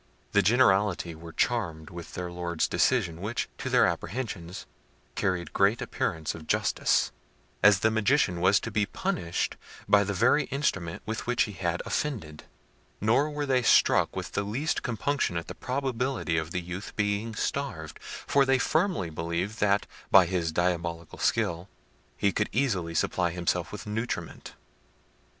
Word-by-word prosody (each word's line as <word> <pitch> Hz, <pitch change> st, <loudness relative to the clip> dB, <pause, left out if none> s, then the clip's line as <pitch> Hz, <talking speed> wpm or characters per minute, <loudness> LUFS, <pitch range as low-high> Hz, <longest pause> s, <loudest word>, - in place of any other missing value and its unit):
The 100 Hz, -, +4 dB
generality 100 Hz, -5 st, +3 dB
were 85 Hz, +1 st, -10 dB
charmed 85 Hz, -8 st, -1 dB
with 85 Hz, -1 st, -9 dB
their 90 Hz, -1 st, -4 dB
lord's 85 Hz, -2 st, -1 dB
decision, 90 Hz, -10 st, +1 dB
which, 110 Hz, +4 st, -2 dB
to -, -, -3 dB
their -, -, +5 dB
apprehensions, 95 Hz, -6 st, -4 dB, 0.5 s
carried 85 Hz, -2 st, -1 dB
great 100 Hz, +4 st, +3 dB
appearance 80 Hz, -1 st, -2 dB
of 80 Hz, -1 st, -10 dB
justice, -, -, +2 dB, 0.5 s
as 100 Hz, 0 st, +6 dB
the 110 Hz, -, +3 dB
Magician 110 Hz, -5 st, +2 dB
was 95 Hz, +3 st, +5 dB
to 115 Hz, -, -5 dB
be 105 Hz, 0 st, +1 dB
punished 100 Hz, -, -2 dB, 0.3 s
by 105 Hz, 0 st, +5 dB
the 100 Hz, 0 st, -3 dB
very 120 Hz, +9 st, +3 dB
instrument 95 Hz, -, -2 dB
with 110 Hz, +2 st, -4 dB
which 125 Hz, 0 st, +3 dB
he 105 Hz, -, -4 dB
had 85 Hz, -3 st, -2 dB
offended: 100 Hz, -, -3 dB, 0.5 s
nor 120 Hz, +8 st, +3 dB
were 150 Hz, -1 st, -3 dB
they 130 Hz, -2 st, +2 dB
struck 120 Hz, -, +4 dB
with -, -, -4 dB
the -, -, 0 dB
least 125 Hz, +10 st, -1 dB
compunction 120 Hz, -5 st, -1 dB
at 85 Hz, -, -3 dB
the -, -, -6 dB
probability 130 Hz, -7 st, -2 dB
of 80 Hz, -1 st, -1 dB
the 90 Hz, +1 st, -2 dB
youth 90 Hz, +3 st, -7 dB
being 105 Hz, +2 st, -1 dB
starved, 95 Hz, -, -3 dB
for 140 Hz, -, 0 dB
they 135 Hz, 0 st, +3 dB
firmly 160 Hz, -, 0 dB
believed 85 Hz, +7 st, -3 dB
that, 100 Hz, 0 st, +2 dB, 0.2 s
by 95 Hz, -2 st, +7 dB
his 85 Hz, -2 st, -1 dB
diabolic 85 Hz, -1 st, -1 dB
skill, 85 Hz, +3 st, 0 dB, 0.5 s
he 100 Hz, -, +2 dB
could 105 Hz, +2 st, -1 dB
easily 95 Hz, -10 st, 0 dB
supply 90 Hz, +2 st, +1 dB
himself 85 Hz, 0 st, -1 dB
with -, -, -7 dB
nutriment. 110 Hz, +3 st, -4 dB
100 Hz, 155 wpm, -28 LUFS, 85-120 Hz, 0.5 s, by